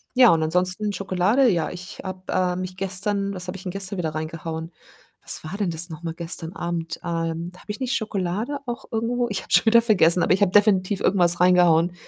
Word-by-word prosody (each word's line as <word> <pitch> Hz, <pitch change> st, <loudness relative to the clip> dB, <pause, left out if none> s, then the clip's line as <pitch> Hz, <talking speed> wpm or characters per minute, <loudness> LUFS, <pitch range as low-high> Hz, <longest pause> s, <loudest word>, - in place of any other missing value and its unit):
Ja, 250 Hz, -2 st, +7 dB
und 165 Hz, -, +2 dB
ansonsten 185 Hz, +5 st, 0 dB
Schokolade 195 Hz, +7 st, +2 dB
ja, 170 Hz, -6 st, 0 dB
ich 180 Hz, 0 st, -9 dB
habe, 185 Hz, 0 st, -7 dB
äh 180 Hz, -1 st, +1 dB
mich 185 Hz, 0 st, -5 dB
gestern 195 Hz, +1 st, -1 dB
was 180 Hz, 0 st, -6 dB
habe 180 Hz, -, -5 dB
ich 185 Hz, -, -10 dB
denn 180 Hz, -, -4 dB
gestern 195 Hz, +1 st, -4 dB
wieder 160 Hz, -3 st, -3 dB
reingehauen? 160 Hz, +1 st, -5 dB, 0.5 s
Was -, -, -1 dB
war 175 Hz, +6 st, -6 dB
denn 205 Hz, -3 st, -1 dB
das 170 Hz, +2 st, -1 dB
noch 160 Hz, +1 st, -9 dB
mal 165 Hz, -1 st, -4 dB
gestern 170 Hz, 0 st, -4 dB
Abend? 170 Hz, -2 st, -4 dB
Ähm, 165 Hz, 0 st, -3 dB
habe -, -, -17 dB
ich 210 Hz, 0 st, -5 dB
nicht 260 Hz, -1 st, -1 dB
Schokolade 215 Hz, +5 st, -3 dB
auch 240 Hz, 0 st, -5 dB
irgendwo 240 Hz, +2 st, -1 dB
ich 200 Hz, -3 st, -1 dB
habe -, -, -16 dB
es -, -, +9 dB
schon -, -, -1 dB
wieder 235 Hz, +1 st, +6 dB
vergessen, 180 Hz, -6 st, +4 dB
aber -, -, +3 dB
ich 190 Hz, -, 0 dB
habe 200 Hz, -3 st, +3 dB
definitiv 200 Hz, -2 st, +3 dB
irgendwas 175 Hz, -3 st, +2 dB
reingehauen. 175 Hz, -1 st, +4 dB
185 Hz, 220 wpm, -23 LUFS, 170-205 Hz, 0.5 s, es